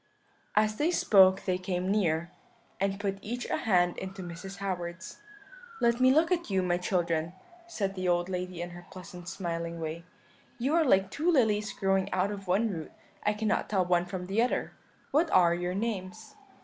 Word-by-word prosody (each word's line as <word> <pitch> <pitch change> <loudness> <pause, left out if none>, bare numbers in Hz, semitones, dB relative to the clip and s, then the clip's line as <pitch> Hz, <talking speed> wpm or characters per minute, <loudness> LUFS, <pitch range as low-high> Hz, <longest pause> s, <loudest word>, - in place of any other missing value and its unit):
"As 215 0 +2
they 310 - +2
spoke 190 - +5
they 185 -1 0
came 185 0 -2
near, 170 -4 +1 0.5
and 195 0 0
put 195 -1 -2
each 240 +4 -4
a - - +1
hand 180 -5 +2
into 190 0 -6
Mrs. 180 +3 -8
Howard's. 180 -2 -5 0.6
"'Let 235 0 +2
me 255 0 +6
look 320 +5 +3
at 345 -6 0
you, 190 -2 +1
my 175 -1 +1
children,' 170 -3 0 0.3
said 205 - -2
the 185 -1 -3
old 175 0 +2
lady 180 -2 -4
in 175 - -7
her 175 0 -11
pleasant 180 -1 -9
smiling 170 -3 -4
way; 165 +1 -5 0.5
'you 260 +5 0
are 335 0 +4
like 195 -8 +3
two 320 +4 0
lilies 215 -7 +2
growing 195 -1 0
out 190 +2 +1
of 200 -2 -7
one 205 +5 +2
root; 160 -4 -6 0.3
I 210 - +2
cannot 215 0 -1
tell 190 -3 +2
one 175 0 +2
from 180 0 -5
the 195 +5 +1
other; 245 - 0 0.4
what 320 +3 +3
are 175 - +5
your 175 +1 -2
names?' 215 0 -4
190 Hz, 185 wpm, -29 LUFS, 175-215 Hz, 0.6 s, me